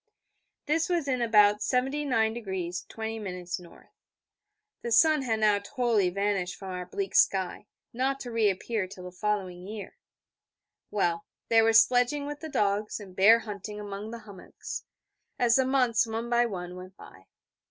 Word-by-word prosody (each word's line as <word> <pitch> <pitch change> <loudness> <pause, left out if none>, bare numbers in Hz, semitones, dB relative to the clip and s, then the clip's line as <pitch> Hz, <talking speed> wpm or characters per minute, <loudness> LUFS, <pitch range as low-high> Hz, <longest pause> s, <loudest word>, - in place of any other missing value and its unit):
This 315 +3 +1
was 340 -5 0
in 255 -2 0
about 210 -3 +5
79° 225 -10 -1
20' 225 0 -5
N. 180 -3 -7 1.0
The 235 - -4
sun 310 +5 +5
had 225 -4 -1
now 210 -1 +4
totally 220 -3 +1
vanished 195 -1 -1
from 190 -2 -8
our 180 -1 -5
bleak 195 +1 -4
sky, 190 +1 +2 0.3
not 265 +3 0
to 245 - -6
reappear 215 -1 0
till 185 -1 -11
the 180 - -8
following 185 -2 -3
year. 210 -1 -8 0.9
Well, 175 -5 -1 0.2
there 225 -1 +5
was 225 0 +7
sledging 250 +5 +2
with 290 0 -6
the 320 - -7
dogs, 210 -4 0
and 190 -3 -12
bear 220 +5 +6
hunting 210 -1 -7
among 205 +1 -6
the 230 0 -8
hummocks, 200 -3 -9 0.5
as 240 -1 +4
the 265 - +3
months, 250 -4 +2
one 225 +2 -4
by 240 0 +3
one, 180 -4 -6
went 185 +1 -11
by. 95 - -15
215 Hz, 150 wpm, -28 LUFS, 190-240 Hz, 1.0 s, was